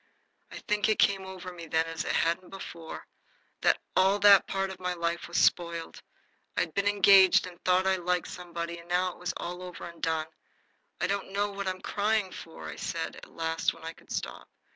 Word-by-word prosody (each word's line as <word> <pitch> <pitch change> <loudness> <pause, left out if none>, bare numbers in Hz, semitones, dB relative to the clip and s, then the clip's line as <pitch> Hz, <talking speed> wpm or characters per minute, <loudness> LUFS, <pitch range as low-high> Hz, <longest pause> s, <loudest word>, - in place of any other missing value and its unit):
I - - -9
think 210 0 +2
it 215 - +3
came 195 -2 +3
over 185 -1 -8
me 170 -2 -9
then, 160 0 +2
as 165 0 -4
it - - -1
hadn't 170 +3 0
before, 170 -4 -8 0.6
that - - +4 0.2
all 190 +2 +4
that 205 -2 +7
part 195 0 -1
of 190 - -9
my 180 -1 -2
life 170 0 -2
was 170 - -3
spoiled. 170 -1 +1 0.6
I'd 160 - 0
been 200 0 +1
engaged 195 -2 +6
and 180 -1 -11
thought 185 +1 +3
I 190 0 +3
liked 180 0 0
somebody, 170 -1 -6
and 170 +1 -15
now 180 +1 +2
it - - -16
was 180 0 -3
all 180 +1 -5
over 180 -1 -8
and 170 -1 -11
done. 160 -1 0 0.7
"I - - +1
don't 200 -1 -2
know 205 +1 0
what 200 -1 -4
I'm 185 0 -3
crying 210 -2 0
for," 80 - -9
I - - -7
said, - - -3
at - - -12
last, 165 0 -1
when - - -15
I 165 0 -5
could - - -19
stop. - - -5
180 Hz, 205 wpm, -29 LUFS, 170-195 Hz, 0.7 s, that